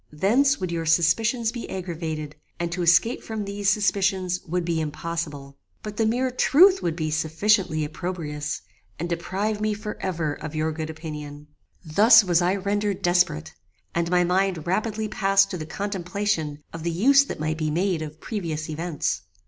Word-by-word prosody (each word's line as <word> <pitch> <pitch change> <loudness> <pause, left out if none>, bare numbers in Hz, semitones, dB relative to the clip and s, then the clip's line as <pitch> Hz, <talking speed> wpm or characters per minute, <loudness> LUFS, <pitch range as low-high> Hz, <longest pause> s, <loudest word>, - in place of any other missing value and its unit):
Thence 240 - +3
would 185 -2 -3
your 165 -1 -2
suspicions 220 +9 +2
be 235 -1 -7
aggravated, 160 -5 -5 0.2
and 170 0 -2
to 180 +1 -2
escape 175 +8 +3
from 220 -2 -5
these 200 0 -1
suspicions 190 -3 +1
would 175 +1 -1
be 165 -2 0
impossible. 150 -3 -5 0.2
But 210 -1 -7
the 225 - +2
mere 250 +3 0
truth 370 +9 +5
would 165 - -1
be 155 -2 -2
sufficiently 160 +1 +1
opprobrious, 150 -2 -4 0.3
and 170 - -3
deprive 195 +5 -2
me 215 0 0
for 210 0 -6
ever 165 -5 -1
of 155 +1 -7
your 155 +1 0
good 155 0 -5
opinion. 150 -2 -8 0.4
"Thus 215 +8 +7
was 175 -2 +2
I 180 +2 +2
rendered 200 0 -1
desperate, 175 - +1 0.4
and 170 0 0
my 180 0 +3
mind 180 -2 0
rapidly 215 +4 -1
passed 195 -1 +3
to 180 - -3
the 155 - -6
contemplation 180 -4 -2
of 165 - -6
the 170 - -1
use 265 +12 +5
that - - -6
might 155 +1 -2
be 155 -1 0
made 175 +1 0
of 155 0 -7
previous 165 -8 -4
events. 165 0 -2
175 Hz, 170 wpm, -24 LUFS, 155-205 Hz, 0.4 s, Thus